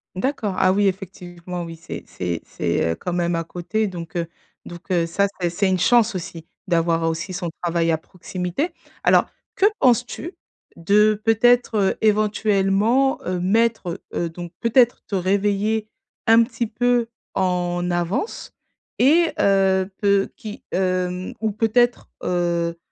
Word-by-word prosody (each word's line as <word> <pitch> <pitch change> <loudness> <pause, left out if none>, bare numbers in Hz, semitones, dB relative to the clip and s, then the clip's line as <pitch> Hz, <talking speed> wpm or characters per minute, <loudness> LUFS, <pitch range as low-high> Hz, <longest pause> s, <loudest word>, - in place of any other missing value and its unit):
D'accord, 215 -1 -1
ah 185 - +4
oui, 200 +1 +3
effectivement 180 -2 -5
oui, 165 -1 -7
c'est 165 - -8
c'est 85 -2 -4
c'est, 85 - -1
heu, - - -2
quand 180 - -5
même 175 0 0
à 165 - -1
côté, 180 +6 -2
donc, 170 -3 -8
heu, 170 -1 -1 0.4
donc, 175 +2 -10
heu, 170 -2 +2
ça 200 +4 +1 0.2
c'est 175 - +1
c'est 190 +4 0
une 185 -1 +1
chance 235 +2 +4
aussi, 170 -3 -7 0.2
d'avoir 165 -2 +1
aussi 170 +3 -4
son 175 -1 -3
travail 170 -1 +1
à 160 - +2
proximité. 180 - -4 0.3
Alors, - - +5 0.3
que 390 - +3
penses-tu 250 - +1 0.4
de, 210 +5 +3
peut-être, 240 +1 +3 0.2
heu, - - -21
éventuellement, 215 +3 +2
heu, 180 0 -2
mettre, 200 -1 +1
heu, 170 - -1
donc, 175 +1 -8
peut-être, 240 +1 +3
te 200 - -3
réveiller, 205 +3 0 0.4
un 225 +1 +7
petit 230 0 -3
peu 240 +1 +1 0.3
en 180 -1 0
avance? 175 - -2 0.5
Et 320 +6 +4
heu, 190 -1 +3
peu 200 -1 +2
qui, 215 -1 -9
hem, 185 0 -1
ou 220 0 0
peut-être, 230 +3 +1
heu 170 -1 0
190 Hz, 145 wpm, -22 LUFS, 175-220 Hz, 0.5 s, un